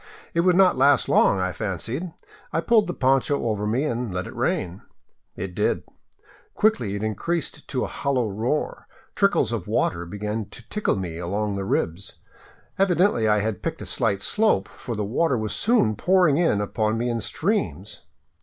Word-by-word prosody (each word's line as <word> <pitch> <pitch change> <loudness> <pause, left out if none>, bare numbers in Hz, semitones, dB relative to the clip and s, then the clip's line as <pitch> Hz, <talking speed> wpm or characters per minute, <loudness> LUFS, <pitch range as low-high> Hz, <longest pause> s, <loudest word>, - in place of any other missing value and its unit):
It 170 - 0
would 180 +1 +4
not 185 -7 +4
last 140 +1 +4
long, 100 - +4
I 95 0 0
fancied. 115 - -4 0.4
I - - 0
pulled 220 +4 +3
the 175 - -2
poncho 135 +1 +2
over 105 -2 -1
me 120 +6 +1
and 120 -6 -2
let 90 0 -3
it - - -9
rain. 90 +2 -1 0.5
It 95 -1 -5
did. - - 0 0.7
Quickly 125 - +1
it 100 - -4
increased 150 - -3
to 130 - -1
a - - -2
hollow 130 -5 -1
roar; 115 +9 -2 0.3
trickles - - +2
of - - -3
water 85 0 0
began 105 +3 -3
to - - -13
tickle 210 - 0
me 85 -4 -4
along 100 +4 -2
the 100 0 -3
ribs. 90 0 -2 0.7
Evidently 180 - +3
I 105 -1 +3
had 110 -2 -2
picked - - -4
a - - -7
slight 100 -3 0
slope, 210 - +2
for 120 - -7
the 105 -1 -2
water 130 +5 +1
was 110 -2 -3
soon 165 - +2
pouring 180 - +3
in 165 -12 +2
upon 110 +2 -1
me 120 +2 -1
in 115 -1 -1
streams. 130 - -2
115 Hz, 175 wpm, -24 LUFS, 100-160 Hz, 0.7 s, would